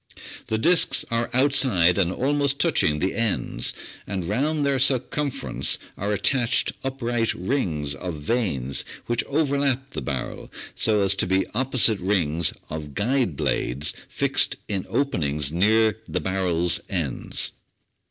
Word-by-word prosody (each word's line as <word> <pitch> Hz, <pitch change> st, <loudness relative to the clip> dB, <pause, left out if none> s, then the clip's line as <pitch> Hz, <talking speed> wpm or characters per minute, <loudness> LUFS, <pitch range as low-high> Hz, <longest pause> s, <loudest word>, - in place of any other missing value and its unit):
The 110 Hz, -, 0 dB
disks 135 Hz, 0 st, +3 dB
are 115 Hz, 0 st, 0 dB
outside 125 Hz, -10 st, +3 dB
and 90 Hz, -2 st, +2 dB
almost 140 Hz, +4 st, 0 dB
touching 110 Hz, -, +2 dB
the 95 Hz, +5 st, -1 dB
ends, 105 Hz, -, -1 dB, 0.4 s
and 95 Hz, -4 st, -3 dB
round 145 Hz, -, 0 dB
their 140 Hz, -1 st, +1 dB
circum 135 Hz, +2 st, +2 dB
ference 70 Hz, -, -1 dB, 0.2 s
are 100 Hz, +2 st, -3 dB
attached 120 Hz, +3 st, +2 dB
upright 120 Hz, -4 st, -1 dB
rings 85 Hz, -, -1 dB
of 85 Hz, +5 st, -5 dB
vanes 75 Hz, -, -1 dB, 0.2 s
which 120 Hz, 0 st, -1 dB
overlap 140 Hz, -2 st, 0 dB
the -, -, -5 dB
barrel, 65 Hz, -3 st, -5 dB, 0.2 s
so 105 Hz, -2 st, +2 dB
as 95 Hz, -, +3 dB
to -, -, -2 dB
be 95 Hz, +1 st, +2 dB
opposite 125 Hz, -3 st, +2 dB
rings 85 Hz, -4 st, +1 dB, 0.2 s
of 75 Hz, -2 st, -7 dB
guide 120 Hz, -, 0 dB
blades 70 Hz, +5 st, 0 dB, 0.2 s
fixed -, -, +1 dB
in 100 Hz, -3 st, -3 dB
open 140 Hz, -10 st, 0 dB
ings 70 Hz, 0 st, +1 dB
near 110 Hz, +5 st, +3 dB
the 90 Hz, -, -2 dB
barrel's 90 Hz, -1 st, +1 dB
ends. 80 Hz, -9 st, -1 dB
105 Hz, 135 wpm, -24 LUFS, 85-130 Hz, 0.4 s, disks